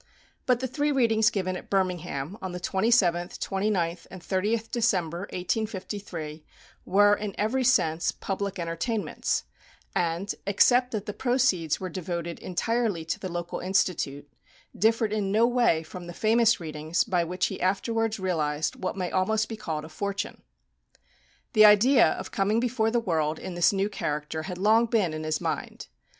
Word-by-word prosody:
But 250 -1 +3
the 260 - -1
three 290 +3 0
readings 225 -5 +3
given 185 -2 -2
at - - -9
Birmingham, 180 -4 -1
on 185 -2 -5
the 180 - -4
27th, 185 -2 +1
29th, 190 -4 -1
and 190 - -9
30th 210 +6 -1
December, 185 -9 0
1853, 185 -5 -4 0.4
were, 205 +2 +5
in 205 -1 -3
every 245 +5 0
sense, 170 -10 +2
public 200 0 -4
entertainments, 170 +6 -2 0.5
and, 170 +3 -1
except 245 +5 +4
that 215 -4 -4
the 210 - -4
proceeds 240 - +1
were 185 - -4
devoted 170 -1 -4
entirely 205 -2 -1
to 160 - -3
the 185 - -5
local 175 0 -4
Institute, 170 -6 0 0.5
differed 225 0 +2
in 200 -2 -1
no 220 +3 +4
way 240 -10 +2
from 175 +2 -9
the 175 - -7
famous 225 +3 +3
readings 155 0 -1
by 180 -2 +1
which 180 +2 -1
he - - -4
afterwards 220 +4 0
realized 155 -5 -1
what 185 - -3
may 180 -2 -2
almost 215 +4 +1
be 225 - -5
called 160 -8 -4
a - - -11
fortune. 200 +4 -4 1.1
The 215 -2 +8
idea 230 +5 +6
of - - -7
coming 210 +1 +1
before 235 -2 +1
the 240 +1 +1
world 160 -7 0
in 185 - -6
this 175 0 +4
new 195 0 0
character 150 -5 -3
had 180 +2 -6
long 220 +5 +4
been 210 -8 +1
in 155 0 -4
his 155 -1 -1
mind. - - -4
190 Hz, 160 wpm, -27 LUFS, 170-220 Hz, 1.1 s, The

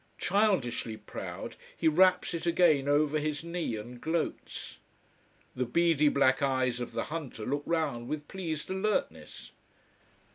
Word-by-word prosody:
Childishly 180 - +1
proud - - -7 0.2
he 165 - +1
wraps 180 +3 +4
it 170 0 -3
again 165 -5 +4
over 150 +1 +3
his 150 0 -2
knee, 170 -7 -2
and 120 +3 -8
gloats. 160 0 -3 0.8
The 125 -1 -1
beady 165 -1 +3
black 135 -1 +3
eyes 130 -3 +1
of 120 - -5
the - - -1
hunter 140 -9 -5
look 145 +2 -1
round 145 -8 -1
with 150 +1 -4
pleased 165 -4 -4
alertness. 200 +3 -2
150 Hz, 135 wpm, -30 LUFS, 130-170 Hz, 0.8 s, wraps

